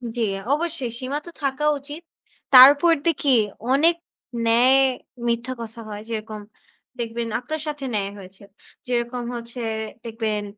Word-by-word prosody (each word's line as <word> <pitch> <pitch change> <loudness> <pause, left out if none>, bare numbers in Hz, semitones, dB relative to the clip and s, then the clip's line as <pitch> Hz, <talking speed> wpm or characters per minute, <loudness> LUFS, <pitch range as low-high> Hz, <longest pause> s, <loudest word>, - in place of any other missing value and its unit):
জী 240 - -2 0.3
অবশ্যই, 305 -5 -2
সীমা 265 +3 -3
তো 345 - -9
থাকা 275 +2 -1
উচিত। 290 +4 -9 0.5
তারপর 285 +6 +9
দেখি 285 -4 +1 0.4
অনেক 325 +5 +4 0.5
ন্যায়, 250 +4 +5 0.5
মিথ্যা 235 +2 -1
কথা 230 0 -8
হয়। 205 0 -6
যেরকম 215 -1 -5 0.6
দেখবেন 230 0 -3
আপনার 310 +5 -5
সাথে 295 -2 -4
ন্যায় 200 -2 -1
হয়েছে। 190 0 -13 0.4
যেরকম 240 0 -2
হচ্ছে 235 +1 -7 0.4
দেখবেন, 220 -2 -2
245 Hz, 125 wpm, -23 LUFS, 230-285 Hz, 0.6 s, তারপর